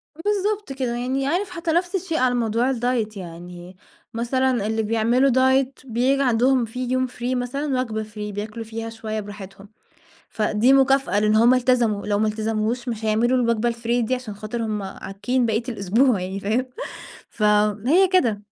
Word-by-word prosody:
بالضبط 410 Hz, -2 st, -1 dB
كده، 255 Hz, -3 st, -2 dB
يعني 260 Hz, +3 st, -1 dB
عارف 365 Hz, +6 st, 0 dB
حتى 335 Hz, -2 st, -3 dB
نَفْس 355 Hz, +3 st, 0 dB
الشيء 340 Hz, -3 st, -2 dB
على 250 Hz, -1 st, +2 dB
موضوع 235 Hz, +2 st, +1 dB
الdiet 230 Hz, -3 st, -1 dB
يعني، 175 Hz, +1 st, -10 dB, 0.4 s
مثلًا 240 Hz, -1 st, 0 dB
اللي 220 Hz, 0 st, 0 dB
بيعملوا 230 Hz, +5 st, +2 dB
diet، 260 Hz, +1 st, +3 dB
بييجي 260 Hz, +3 st, +1 dB
عندهم 250 Hz, 0 st, +3 dB
في 250 Hz, +3 st, -5 dB
يوم 255 Hz, 0 st, +1 dB
free، 250 Hz, 0 st, -3 dB
مثلًا 255 Hz, +2 st, -1 dB
وجبة 220 Hz, -3 st, -3 dB
free، 210 Hz, -1 st, -7 dB
بياكلوا 215 Hz, +3 st, -5 dB
فيها 225 Hz, +1 st, -6 dB
شوية 220 Hz, -1 st, -5 dB
براحتهم. 200 Hz, -1 st, -10 dB, 0.6 s
فدي 215 Hz, +3 st, +2 dB
مكافأة، 270 Hz, -4 st, +3 dB
لأن 215 Hz, +1 st, +3 dB
هُم 235 Hz, +3 st, +6 dB
التزموا، 240 Hz, -5 st, +1 dB
لو 205 Hz, -1 st, +1 dB
ما 215 Hz, +1 st, +2 dB
التزموش، 220 Hz, +3 st, -2 dB
مش 225 Hz, -2 st, -4 dB
هيعملوا 235 Hz, +4 st, +2 dB
الوجبة 235 Hz, -1 st, +1 dB
الfree 235 Hz, +1 st, -1 dB
دي، 255 Hz, -, +1 dB
عشان 250 Hz, -5 st, -6 dB
خاطر 215 Hz, +3 st, -5 dB
هُم 210 Hz, -2 st, -2 dB
عاكين 200 Hz, +6 st, -2 dB
بقية 220 Hz, +1 st, 0 dB
الأسبوع 225 Hz, +1 st, +2 dB
يعني، 190 Hz, +2 st, -4 dB
فاهم؟ 225 Hz, +6 st, 0 dB, 0.6 s
ف 215 Hz, -, -8 dB, 0.4 s
هي 365 Hz, +7 st, +5 dB
كده. 240 Hz, -, +2 dB
235 Hz, 165 wpm, -22 LUFS, 215-260 Hz, 0.6 s, هُم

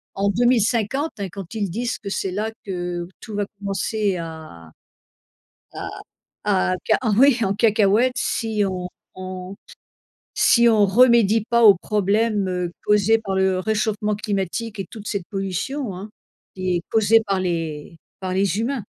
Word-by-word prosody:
en 200 Hz, +1 st, +1 dB
2050, 240 Hz, -, +1 dB
hein, 195 Hz, -2 st, -3 dB
quand 195 Hz, +1 st, -9 dB
ils 205 Hz, -3 st, -1 dB
disent 240 Hz, +5 st, -2 dB
que 200 Hz, -, -6 dB
c'est 195 Hz, -1 st, -2 dB
là 215 Hz, +3 st, -2 dB
que 175 Hz, -2 st, -4 dB
tout 215 Hz, -3 st, -8 dB
va 205 Hz, -1 st, 0 dB
commencer 200 Hz, 0 st, -1 dB
à 160 Hz, -, -9 dB, 1.0 s
à -, -, -6 dB, 0.6 s
à 185 Hz, -2 st, +2 dB
ca -, -, +4 dB, 0.2 s
oui 265 Hz, -1 st, +5 dB
en 195 Hz, 0 st, +1 dB
cacahuète 215 Hz, +3 st, +3 dB
si 220 Hz, -3 st, -1 dB
on 180 Hz, -1 st, -4 dB, 0.3 s
on 185 Hz, 0 st, -7 dB, 0.8 s
si 235 Hz, -1 st, +5 dB
on 215 Hz, -3 st, +4 dB
remédie 225 Hz, 0 st, +4 dB
pas 235 Hz, 0 st, +3 dB
aux 200 Hz, -, +9 dB
problèmes 200 Hz, -3 st, 0 dB, 0.2 s
causés 210 Hz, +2 st, +4 dB
par 195 Hz, -3 st, -4 dB
le 190 Hz, -1 st, +2 dB
réchauffement 210 Hz, +1 st, -1 dB
climatique 205 Hz, +1 st, -3 dB
et 195 Hz, -, -3 dB
toute 215 Hz, -2 st, -9 dB
cette 200 Hz, -5 st, -3 dB
pollution 195 Hz, -, -3 dB
hein, 200 Hz, +3 st, -8 dB, 0.5 s
qui 185 Hz, -1 st, -1 dB
est -, -, -4 dB
causée 225 Hz, 0 st, +4 dB
par 195 Hz, -1 st, +1 dB
les 165 Hz, -3 st, -3 dB, 0.2 s
par 185 Hz, -1 st, -3 dB
les 195 Hz, +2 st, +1 dB
humains. 245 Hz, 0 st, -2 dB
200 Hz, 150 wpm, -22 LUFS, 185-225 Hz, 1.0 s, aux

